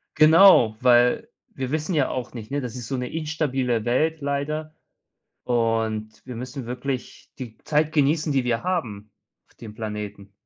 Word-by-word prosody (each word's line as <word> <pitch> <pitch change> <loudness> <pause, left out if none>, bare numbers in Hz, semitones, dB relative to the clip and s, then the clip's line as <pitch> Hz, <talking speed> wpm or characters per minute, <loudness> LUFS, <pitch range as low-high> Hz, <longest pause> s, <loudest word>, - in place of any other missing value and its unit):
Genau, 155 - +7
weil 125 -1 +4 0.2
wir 130 0 -4
wissen 155 +4 -2
ja 145 -4 +2
auch 130 -2 -5
nicht, 115 +1 -9
ne? 145 - -1
Das 125 -2 -6
ist 120 -3 -7
so 135 - -2
'ne 125 0 -4
instabile 135 -7 -1
Welt 155 +7 +1
leider 150 +2 -3 0.7
und 115 -2 -1
wir 125 - -7
müssen 125 +1 -6
wirklich 125 +1 -5
die 120 -4 -8
Zeit 150 +1 0
genießen, 150 +1 +2
die 135 -2 +1
wir 120 -2 0
haben 110 - -3 0.4
auf - - -30
dem 110 -2 -10
Planeten. 105 -2 -6
125 Hz, 160 wpm, -24 LUFS, 115-150 Hz, 0.7 s, Genau